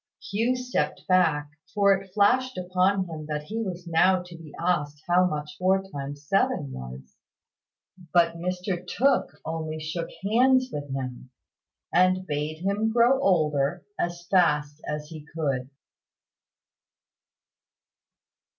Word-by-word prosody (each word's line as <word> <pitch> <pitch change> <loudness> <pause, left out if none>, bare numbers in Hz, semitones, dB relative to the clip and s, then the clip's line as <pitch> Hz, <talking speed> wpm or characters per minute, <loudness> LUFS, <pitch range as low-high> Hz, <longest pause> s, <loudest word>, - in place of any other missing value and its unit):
Hugh 230 +5 0
stepped 250 0 -2
back, 160 -6 +3 0.2
for 200 -1 +5
it 195 -1 -4
flashed 250 +6 +2
upon 185 +2 +1
him 155 -2 -7
that 150 -1 -3
he 220 +8 -4
was 180 -4 -5
now 180 +2 +3
to 180 -1 -12
be 165 -3 -12
asked 150 -4 -1
how 180 +1 +4
much 150 -3 -4
four 190 +1 +3
times 145 0 -7
seven 195 - +1
was. 65 - -9 0.9
But 170 -1 +4
Mr 180 +1 -3
Tooke 265 +8 +1
only 160 -1 -4
shook 160 +2 -4
hands 255 +5 +4
with 145 -1 -5
him, 130 -1 -5 0.6
and 185 +1 +3
bade 155 +1 -3
him 210 +3 +1
grow 240 +4 +4
older 155 - +1
as 175 0 -2
fast 150 -5 +2
as 150 0 -3
he 155 -2 -9
could. 140 -5 -3
175 Hz, 125 wpm, -26 LUFS, 150-195 Hz, 0.9 s, for